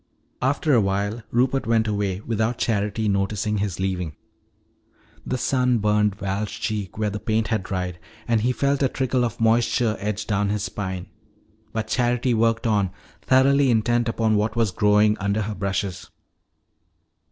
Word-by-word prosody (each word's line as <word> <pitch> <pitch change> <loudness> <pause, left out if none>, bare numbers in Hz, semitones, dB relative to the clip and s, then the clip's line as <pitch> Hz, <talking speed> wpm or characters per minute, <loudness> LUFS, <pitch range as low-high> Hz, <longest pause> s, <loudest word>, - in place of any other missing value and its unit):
After 140 +3 +1
a 120 - +5
while 100 +3 -1
Rupert 130 +2 +1
went 115 -1 +2
away 100 -2 -1
without 115 +1 -1
Charity 105 0 0
noticing 105 +1 0
his 100 -3 -2
leaving. 90 -5 -2 1.1
The 130 - -1
sun 125 -1 +1
burned 105 -1 +2
Val's 100 +1 -3
cheek 110 -4 -4
where 105 -1 0
the 105 - -4
paint 110 0 0
had 110 -3 +1
dried 90 -2 -4 0.3
and 115 -2 +2
he 125 +3 +2
felt 140 +2 0
a 135 - +3
trickle 130 -1 0
of 115 -3 -3
moisture 115 0 +2
edge 105 +1 -3
down 105 -1 0
his 105 -1 -1
spine. 95 -2 -4 0.7
But 110 -1 -3
Charity 125 +1 +1
worked 115 0 +1
on, 105 -4 +2 0.3
thoroughly 135 +1 +4
intent 120 +1 +2
upon 110 -1 +1
what 105 +2 0
was 115 -4 +1
growing 105 +2 +3
under 100 +2 0
her 105 +1 -3
brushes. 95 -2 -3
110 Hz, 155 wpm, -23 LUFS, 100-120 Hz, 1.1 s, a